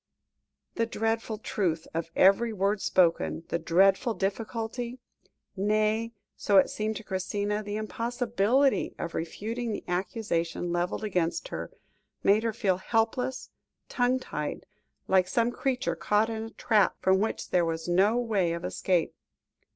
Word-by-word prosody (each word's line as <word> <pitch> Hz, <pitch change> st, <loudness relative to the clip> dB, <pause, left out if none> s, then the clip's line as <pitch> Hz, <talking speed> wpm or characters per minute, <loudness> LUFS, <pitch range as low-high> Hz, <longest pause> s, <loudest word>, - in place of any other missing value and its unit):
The 230 Hz, -, +1 dB
dreadful 225 Hz, -1 st, -1 dB
truth 175 Hz, -7 st, -1 dB
of 165 Hz, 0 st, -3 dB
every 200 Hz, +5 st, +5 dB
word 200 Hz, 0 st, 0 dB
spoken, 170 Hz, -2 st, +2 dB
the 170 Hz, -, 0 dB
dreadful 195 Hz, +7 st, +3 dB
difficulty 225 Hz, +4 st, -3 dB, 0.6 s
nay, 215 Hz, +3 st, +1 dB, 0.2 s
so 200 Hz, -, +2 dB
it 190 Hz, -, +5 dB
seemed 215 Hz, +1 st, -2 dB
to 225 Hz, -, -6 dB
Christina, 205 Hz, +2 st, -2 dB
the 205 Hz, 0 st, -5 dB
impossibility 235 Hz, +3 st, +1 dB
of 170 Hz, -, -5 dB
refuting 225 Hz, +8 st, -3 dB
the -, -, -5 dB
accusation 175 Hz, -2 st, -2 dB
levelled 175 Hz, +4 st, -1 dB
against 180 Hz, -, -1 dB
her, -, -, -5 dB, 0.5 s
made 205 Hz, +2 st, +5 dB
her 230 Hz, 0 st, 0 dB
feel 200 Hz, -4 st, 0 dB
helpless, 225 Hz, +6 st, -1 dB, 0.4 s
tongue 250 Hz, 0 st, +2 dB
tied, 150 Hz, -12 st, -5 dB, 0.4 s
like 185 Hz, -1 st, +4 dB
some 235 Hz, +5 st, +1 dB
creature 255 Hz, +1 st, -1 dB
caught 215 Hz, +2 st, +1 dB
in 220 Hz, 0 st, -4 dB
a -, -, -7 dB
trap, 215 Hz, -3 st, +2 dB
from 190 Hz, 0 st, +3 dB
which 220 Hz, +2 st, -2 dB
there 180 Hz, -1 st, +3 dB
was 165 Hz, 0 st, -2 dB
no 195 Hz, +6 st, +3 dB
way 205 Hz, -8 st, +1 dB
of 170 Hz, +1 st, -4 dB
escape. 180 Hz, -3 st, 0 dB
210 Hz, 140 wpm, -28 LUFS, 185-230 Hz, 0.6 s, every